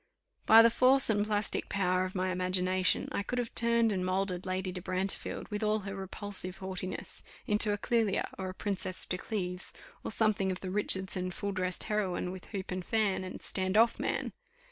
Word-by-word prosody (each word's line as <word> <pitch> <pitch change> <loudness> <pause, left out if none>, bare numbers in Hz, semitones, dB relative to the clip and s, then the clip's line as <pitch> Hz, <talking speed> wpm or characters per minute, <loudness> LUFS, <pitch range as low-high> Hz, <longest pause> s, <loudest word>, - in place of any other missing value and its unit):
By 225 +1 +9
the 230 - +6
force 255 0 +5
and 205 0 +1
plastic 210 -1 -1
power 185 -1 +1
of 185 - -7
my 185 0 0
imagination, 185 0 +1
I - - -1
could 245 +5 -4
have 240 -2 -2
turned 235 -1 +3
and 185 -2 -1
moulded 185 0 -1
Lady 185 0 -2
de 180 0 -6
Brantefield, 185 +2 -2
with 210 +1 -3
all 215 0 +1
her 195 0 -6
repulsive 190 -1 -3
haughtiness, 185 -1 -6 0.2
into 210 0 +2
a 205 - 0
Clelia, 225 -2 +1
or 190 -1 -4
a - - -6
Princess 190 -2 -3
de 180 - -3
Cleves, 180 -4 -3 0.3
or - - -3
something 215 -3 +2
of 185 - -5
the 185 - -4
Richardson 190 -2 +2
full 200 +3 -4
dressed 185 -1 -1
heroine, 190 -4 -1
with 185 -1 -9
hoop 195 -3 -6
and 185 0 -3
fan, 210 -2 +1
and 185 - -7
stand 190 +1 0
off, 230 +1 +4
man! - - -2
190 Hz, 190 wpm, -31 LUFS, 185-210 Hz, 0.3 s, By